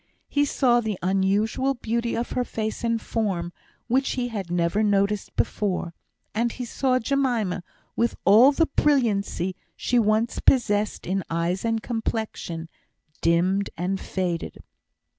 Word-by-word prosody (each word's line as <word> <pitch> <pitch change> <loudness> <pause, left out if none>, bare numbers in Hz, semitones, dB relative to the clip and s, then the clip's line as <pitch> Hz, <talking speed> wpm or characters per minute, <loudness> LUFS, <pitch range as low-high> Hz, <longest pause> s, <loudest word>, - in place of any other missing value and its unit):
He 290 0 +2
saw 245 -4 +3
the 215 -4 -2
unusual 200 +8 +1
beauty 235 0 -2
of 235 - -3
her 250 - 0
face 220 -2 -4
and 230 -1 +1
form, 190 -7 -2 0.3
which 265 +3 +1
he 245 -1 -2
had 200 -6 -5
never 175 +3 +1
noticed 205 -1 +1
before; 180 -4 -1 0.4
and 235 +2 +1
he 250 - -5
saw 255 +2 +1
Jemima, 240 -8 0 0.3
with 235 - +1
all 220 +9 +8
the 325 +3 +2
brilliancy 205 - +1 0.2
she 245 - +1
once 220 +1 +1
possessed 210 -5 +2
in 190 +1 -1
eyes 170 +3 -1
and 225 -1 0
complexion, 220 -8 -3 0.5
dimmed 180 +4 +2
and 185 +3 -1
faded. 180 -3 -3
215 Hz, 135 wpm, -25 LUFS, 190-240 Hz, 0.5 s, all